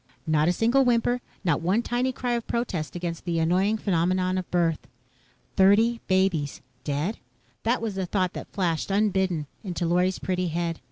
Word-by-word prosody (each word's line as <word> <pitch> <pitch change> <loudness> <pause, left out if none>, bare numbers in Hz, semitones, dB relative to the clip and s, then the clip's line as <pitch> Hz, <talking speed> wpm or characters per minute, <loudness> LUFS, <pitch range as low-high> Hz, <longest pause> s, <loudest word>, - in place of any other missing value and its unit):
Not 155 -1 +2
a - - +4
single 235 +8 +3
whimper. 245 0 +2 0.2
Not 165 -6 +1
one 190 +8 +1
tiny 245 +2 0
cry 250 -1 -3
of 235 -1 -1
protest 185 -11 -2
against 170 -1 -4
the 170 -2 -1
annoying 185 +6 +2
phenomenon 185 -1 +1
of 185 - -7
birth. 170 -3 0 0.7
Thirty 220 +5 +4
babies 185 -7 +1 0.2
dead? 150 +9 -2 0.4
That 230 +1 0
was 220 -3 -2
the 190 -1 -3
thought 185 -1 0
that - - -8
flashed, 175 -5 -1
unbidden, 190 -5 +1 0.2
into 180 -3 -3
Lorry's 180 +2 +2
pretty 185 -1 -1
head. 170 0 -2
185 Hz, 165 wpm, -26 LUFS, 170-220 Hz, 0.7 s, a